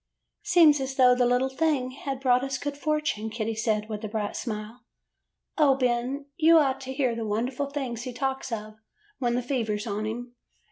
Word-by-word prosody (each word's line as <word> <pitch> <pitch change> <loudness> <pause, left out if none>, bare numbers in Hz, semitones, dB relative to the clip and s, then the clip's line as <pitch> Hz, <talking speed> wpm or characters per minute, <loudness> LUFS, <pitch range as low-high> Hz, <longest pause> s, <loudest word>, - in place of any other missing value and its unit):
'' - - -56
'Seems 320 -5 +5
as 265 0 -3
though 250 -2 +6
the 245 0 +2
little 250 +2 +2
thing 265 -2 0
had 270 0 -5
brought 250 -1 +3
us 270 -1 -2
good 290 +2 -4
fortune,' 300 -7 -1
Kitty 225 0 -3
said, 215 -1 -1
with 215 -1 -6
a - - -2
bright 210 -1 -3
smile. 220 +1 -5 0.8
'O, 285 -3 +5
Ben, 255 +2 -1
you 330 0 +6
ought 270 -3 +2
to 265 0 -6
hear 260 -3 +1
the 230 - -3
wonderful 245 +6 -2
things 260 -5 -4
he 255 - -5
talks 265 +1 -3
of 215 -1 -5 0.4
when 240 -2 0
the 250 - -1
fever 235 -5 -1
's 210 - -6
on 215 0 -2
him. 240 +2 -5
250 Hz, 200 wpm, -27 LUFS, 225-275 Hz, 0.8 s, though